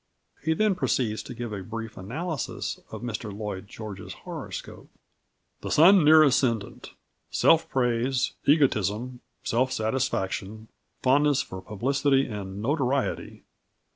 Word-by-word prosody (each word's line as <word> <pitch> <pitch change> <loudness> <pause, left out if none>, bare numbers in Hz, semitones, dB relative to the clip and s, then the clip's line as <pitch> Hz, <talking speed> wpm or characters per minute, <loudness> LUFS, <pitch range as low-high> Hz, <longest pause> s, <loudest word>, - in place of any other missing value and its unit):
He 160 0 +1
then 215 +2 +3
proceeds 120 - 0
to - - -9
give 120 -3 -5
a 100 - -4
"brief 115 +3 -6
analysis" 140 - -4
of - - -8
Mr 115 -2 -4
Lloyd 100 -1 -5
George's 105 -2 -8
horoscope: - - -7 0.7
"The - - -6
Sun 180 +3 +7
near 155 +1 +8
Ascendant 120 -7 0 0.4
self 165 0 +3
praise, 125 0 +1
egotism, 125 - +2 0.2
self 130 +3 +1
satisfaction, 110 -2 -2 0.3
fondness 140 +1 +3
for 95 - -8
publicity 135 +7 +1
and 100 -2 -6
notoriety. 140 0 -1
120 Hz, 115 wpm, -26 LUFS, 105-140 Hz, 0.7 s, near